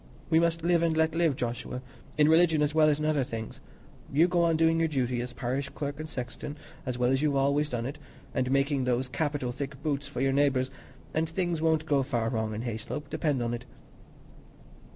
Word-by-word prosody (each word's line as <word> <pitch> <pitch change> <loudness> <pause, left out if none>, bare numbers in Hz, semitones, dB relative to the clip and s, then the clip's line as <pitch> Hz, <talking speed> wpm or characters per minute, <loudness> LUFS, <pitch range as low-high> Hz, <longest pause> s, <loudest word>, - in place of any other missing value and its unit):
We 160 - +6
must 165 -1 +1
'live 170 -1 +3
and 165 -1 +1
let 160 0 +3
live,' 165 -4 +2
Joshua, 125 +1 -4 0.3
in 150 -1 +5
religion 160 -1 +5
as 150 0 0
well 155 -1 +5
as 150 0 +1
in 150 - -1
other 150 -3 +2
things. 115 -3 -6 0.5
You 160 +5 +5
go 175 -1 +2
on 165 -1 +3
doing 165 0 +3
your 165 - +3
duty, 125 -5 0
as 125 0 -5
parish 135 +3 -2
clerk 145 0 -5
and 155 0 -5
sexton, 125 +3 -6 0.3
as 125 -1 -2
well 125 0 +2
as 135 +1 +2
you've 150 -2 +2
always 140 +2 +2
done 120 -3 -2
it, 145 +3 -5 0.3
and 130 0 0
making 135 0 +2
those 125 +1 +1
capital 145 -2 -1
thick 135 +1 -5
boots 145 -2 -1
for 145 - -6
your 135 +1 +2
neighbours, 135 -2 +2 0.4
and 160 0 0
things 175 -1 -1
won't 160 -1 +2
go 145 -3 +2
far 120 -4 -1
wrong 110 -2 -2
in 110 - -4
Hayslope, 120 +5 -5
depend 145 -5 0
upon 120 0 -1
it." 120 +1 -5
145 Hz, 215 wpm, -29 LUFS, 125-160 Hz, 0.5 s, We